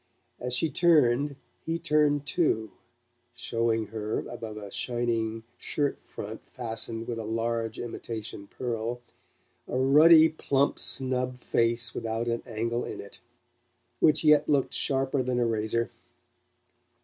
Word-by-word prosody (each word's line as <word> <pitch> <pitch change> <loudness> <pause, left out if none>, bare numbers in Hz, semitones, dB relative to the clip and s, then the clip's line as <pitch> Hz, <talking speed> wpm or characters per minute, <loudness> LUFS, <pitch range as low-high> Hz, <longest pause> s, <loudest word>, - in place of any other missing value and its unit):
As 125 0 -1
she 160 - +3
turned 145 -4 +3 0.3
he 165 +1 -1
turned 150 -3 +2
too, 110 - 0 0.6
showing 115 -2 0
her, 110 0 -3
above 110 -2 -7
a 100 -2 -8
shining 115 -2 -1 0.2
shirt 145 -1 -1
front 110 +2 -7
fastened 115 -1 -3
with 115 -2 -3
a - - -4
large 115 0 -2
imitation 110 -3 -6
pearl, 120 0 -3 0.7
a - - -2
ruddy 155 +5 +7
plump 140 -3 0
snub 130 -1 0
face 115 0 +1
without 115 +1 -3
an 115 0 -1
angle 115 +2 -2
in - - -6
it, 100 - -9 0.8
which 155 - +4
yet 150 -1 +5
looked 140 -3 +2
sharper 135 0 +1
than 125 -1 -1
a 120 - +2
razor. 115 +1 0
120 Hz, 125 wpm, -28 LUFS, 115-140 Hz, 0.8 s, ruddy